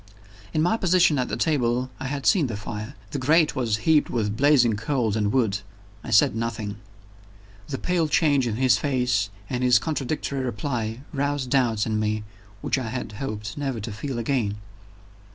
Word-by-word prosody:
In 155 - +1
my 220 +6 +2
position 180 -7 +3
at 125 - 0
the - - -2
table, 130 -4 +1
I 130 - -4
had 140 0 -4
seen 175 -10 +4
the 110 -4 -4
fire: 105 +4 -6 0.2
the 145 - -2
grate 155 +4 +3
was 115 -5 0
heaped 155 -2 +4
with 105 -3 -1
blazing 130 -3 +4
coals 110 -1 -1
and 105 -2 +1
wood. 110 -5 +1 0.4
I - - -7
said 110 -1 +4
nothing. 110 -3 -3 0.9
The 135 - -3
pale 175 0 0
change 145 -4 +3
in 110 - -1
his 125 -2 +3
face, 125 -6 +1 0.2
and 125 +2 -2
his 125 -1 +6
contradictory 140 -2 -2
reply, 115 -1 -3
roused 140 -2 -1
doubts 120 -6 +2
in 110 -1 -1
me 110 0 -1 0.4
which - - 0
I 120 -4 -4
had 120 -2 -4
hoped 105 -2 -5
never 135 -5 -2
to 110 +2 -5
feel 125 +5 -5
again. 115 -4 0
125 Hz, 175 wpm, -24 LUFS, 110-140 Hz, 0.9 s, his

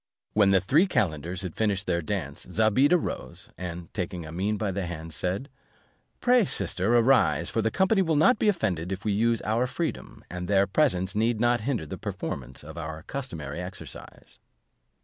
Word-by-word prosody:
When 105 -2 +5
the 95 -1 +5
three 150 - +3
calenders 90 - -1
had 90 -3 -4
finished 100 -3 0
their 85 -1 0
dance, 75 - -4
Zobeide 110 +7 +3
arose, 180 - -2
and 85 -1 -7
taking 90 -3 -3
Amene 95 +7 -2
by 105 -1 -1
the 95 -1 -3
hand, 80 -1 -6
said, 95 - -2 0.7
"Pray, 250 -1 +5
sister, 100 - +1
arise, 115 - +3
for 115 - +1
the 110 - +1
company 190 - +2
will 165 -4 +1
not 210 +11 +4
be - - +2
offended 95 - -1
if 95 +2 -5
we 105 - +2
use 115 +2 +1
our 115 +4 +1
freedom, 165 +5 -4
and 90 0 -5
their 100 0 +4
presence 95 -6 +2
need 110 +1 +1
not 120 0 +2
hinder 115 - -1
the 75 - -7
performance 65 0 -5
of 80 +3 -8
our 80 -1 -6
customary 85 - -5
exercise." 90 +1 -9
100 Hz, 175 wpm, -27 LUFS, 90-120 Hz, 0.7 s, When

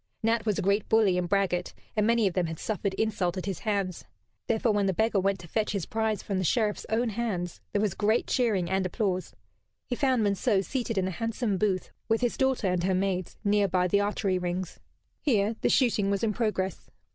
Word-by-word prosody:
Nat 225 0 +1
was 210 - +1
a - - -1
great 200 +2 +1
bully 215 -4 +4
and 180 -1 -1
braggart, 185 -3 0 0.2
and 215 -1 +2
many 230 -1 +3
of 190 - +1
them 180 -2 0
had 160 0 -5
suffered 200 0 -2
insult 195 -5 0
at 185 - -4
his 195 -3 -3
hands. 200 -5 -2 0.4
Therefore, 230 +1 +2
when 205 -1 +1
the 190 - 0
beggar 220 0 +2
went 195 +1 +1
to 170 - -11
fetch 215 +4 -1
his 195 -5 -2
prize 220 -1 -1
from 195 -2 -2
the - - 0
Sheriff's 210 +4 0
own 230 +2 +1
hands, 195 -6 -3
there 205 - +1
was 205 -4 +1
great 215 +4 +1
cheering 215 -8 +1
and 190 +2 +1
applause. 185 -1 -2 0.5
He 245 - -2
found 260 -3 +2
Monceux 200 0 +1
seated 240 -5 -2
in 185 -1 +1
a - - -2
handsome 225 0 -2
booth, 195 -4 0 0.2
with 225 +1 +2
his 245 -1 +1
daughter 265 -5 +1
and 180 -2 +1
her 190 0 +2
maids, 185 -1 -1
near 205 -1 +3
by 180 0 +1
the 200 +3 +3
archery 200 -2 0
rings. 180 0 -3 0.4
Here 220 -5 +2
the - - +2
shooting 220 -6 +3
was 200 +1 0
in 215 -2 +1
progress. 205 -4 -2
200 Hz, 215 wpm, -28 LUFS, 185-220 Hz, 0.5 s, bully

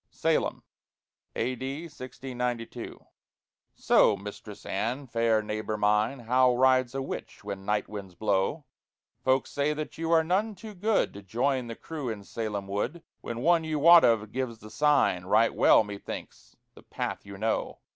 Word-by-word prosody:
SALEM - - 0 0.7
[A.D. 130 +5 -3
1692] 125 -5 -6 0.7
Soe, 100 - +4
Mistress 105 +1 -9
Anne, 120 +8 -2
faire 115 -3 +1
neighboure 110 0 -3
myne, 105 +5 +1
How 125 +1 +4
rides 130 0 +3
a 135 - -1
witch - - -7
when 95 0 -6
night 105 0 0
winds 100 -4 -8
blowe? 105 - 0 0.6
Folk 130 0 +3
say 145 +1 -1
that 155 +1 -6
you 165 0 -2
are 165 -1 +5
none 200 +6 0
too 215 +3 -10
goode 205 +3 +1
To 100 - -9
joyne 120 +6 -1
the 115 - -6
crewe 150 -3 -6
in 105 -3 -5
Salem 105 -2 -4
woode, 120 - -3 0.2
When 120 0 -5
one 170 +2 +4
you 155 -1 -2
wot 170 +3 +8
of 110 -2 +2
gives 130 -3 -3
the 110 0 -13
signe: 145 -12 +2
Righte 110 +4 +4
well, - - +5
methinks, 100 -1 -8 0.2
the - - -15
pathe - - -4
you 100 -1 -10
knowe. 110 +2 -1
120 Hz, 155 wpm, -28 LUFS, 105-145 Hz, 0.7 s, wot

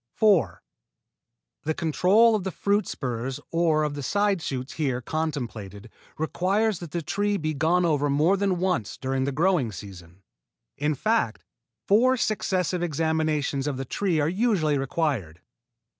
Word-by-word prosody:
4. 165 - +3 1.0
The 155 - -1
control 190 +7 +4
of 210 -3 0
the 190 - -2
fruit 200 +3 0
spurs 125 0 -4
or 165 -2 +2
of 150 -1 -1
the 145 - -5
side 200 +4 +1
shoots 130 -3 -4
here 135 -6 -1
contemplated 120 -9 -4 0.3
requires 195 +6 0
that 170 - -8
the 170 +2 -3
trees 205 +5 0
be 155 -3 -2
gone 165 +5 +2
over 145 -3 +1
more 155 +7 +3
than 195 -2 0
once 180 - -1
during 130 0 -1
the 140 - -1
growing 160 - +1
season. 95 -2 -11 0.5
In 150 +1 0
fact, 215 - 0 0.4
four 255 +6 +4
successive 185 - 0
examinations 155 -3 0
of 140 -3 -2
the 135 - -4
tree 175 +3 0
are 145 - +2
usually 185 -5 +1
required. 135 - -2
155 Hz, 145 wpm, -25 LUFS, 135-190 Hz, 1.0 s, control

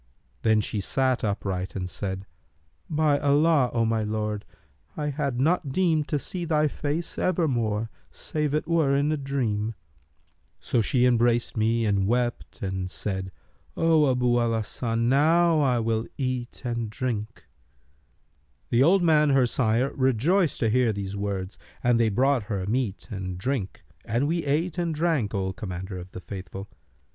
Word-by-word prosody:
Then 110 -1 +3
she 105 0 -2
sat 130 +5 0
upright 95 -3 -2
and 90 -2 -3
said, 95 +1 -5 0.6
'By 150 -2 +2
Allah, 145 -1 +3
O 115 -1 +1
my 110 0 +1
lord, 105 -1 -2 0.5
I 150 -1 -1
had 140 -3 -2
not 150 0 +1
deemed 160 -2 +1
to 150 - 0
see 175 +5 -4
thy 155 -2 +2
face 150 +4 -3
ever 180 -3 +1
more, 115 -4 -1 0.2
save 150 -2 -2
it 155 - -1
were 160 -5 +2
in 145 +2 +2
a - - +1
dream!' 115 -6 -2 0.8
So 120 - 0
she 125 +2 +2
embraced 120 -1 +2
me 115 +1 +1
and 100 -2 +1
wept, 120 -1 -1
and 95 -1 -2
said, 95 -1 -3 0.5
'O 160 -3 +4
Abu 125 -1 +2
al 115 -1 +1
Hasan, 115 +2 -1
now 150 -1 +4
will 110 0 0
I - - -16
eat 130 -3 -3
and 115 -2 -2
drink.' 110 -1 -4 1.3
The 120 - +4
old 180 +6 +5
man 155 -3 +4
her 135 -2 +4
sire 120 +2 +1
rejoiced 140 - +2
to 115 - +3
hear 125 -1 +3
these 100 -1 -4
words 100 -1 -4 0.2
and 120 -1 +3
they 115 -1 +3
brought 125 +2 +2
her 95 -4 -2
meat 110 -1 -2
and 95 -3 -4
drink 110 0 -3 0.2
and 120 +6 0
we 165 0 -1
ate 160 +5 0
and 170 -2 -1
drank, 150 -10 0
O 95 -1 -1
Commander 95 -3 -6
of 90 +1 -11
the 90 - -7
Faithful. 95 +1 -8
120 Hz, 160 wpm, -26 LUFS, 105-145 Hz, 1.3 s, old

